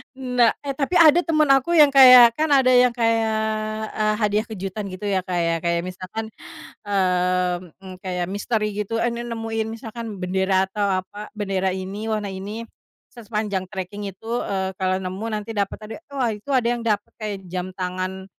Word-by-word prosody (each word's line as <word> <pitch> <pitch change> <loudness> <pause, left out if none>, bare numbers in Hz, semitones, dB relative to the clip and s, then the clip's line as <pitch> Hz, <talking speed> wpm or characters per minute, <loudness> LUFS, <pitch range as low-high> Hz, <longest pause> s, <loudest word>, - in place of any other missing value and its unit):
Nah 250 -3 +2
eh 275 -2 -5
tapi 290 +4 -2
ada 340 0 +6
teman 310 -3 +2
aku 275 +5 +4
yang 300 -4 +7
kayak 250 -4 +8
kan 310 - +2
ada 265 -2 +5
yang 250 -1 +5
kayak, 225 -2 +1 0.6
eee, 215 0 +2
hadiah 210 +1 +1
kejutan 200 -1 -5
gitu 205 +2 -4
ya 190 -2 0
Kak 180 -2 -2
ya, 165 - +1
kayak 170 +1 -1
misalkan, 185 +4 -6 0.5
mmm, 180 -2 -1
kayak 180 -1 -3
misteri 215 +1 -1
gitu 210 +2 -3
ini 235 0 -1
nemuin 225 -2 -3
misalkan 225 -2 -7
bendera 190 +1 +1
atau 200 +2 -2 0.2
apa, 210 +2 -10
bendera 195 -2 -1
ini 195 +4 -5
warna 210 -2 -2
ini, 205 +4 -6 0.5
se 240 - -12
sepanjang 210 -4 -3
treking 200 +1 -6
itu, 195 +2 -13 0.2
eee, 190 -1 -2
kalo 185 0 +1
nemu 190 +2 -5
nanti 215 0 -4
dapat 200 -2 -2
hadiah. 220 +8 -8 0.2
Wah 245 -4 +1
itu 210 +5 -11
ada 240 -2 +2
yang 240 - -3
dapat 210 -2 -1
kayak 210 -2 -3 0.2
jam 180 -1 -2
tangan, 185 +1 -4
210 Hz, 175 wpm, -22 LUFS, 190-235 Hz, 0.6 s, kayak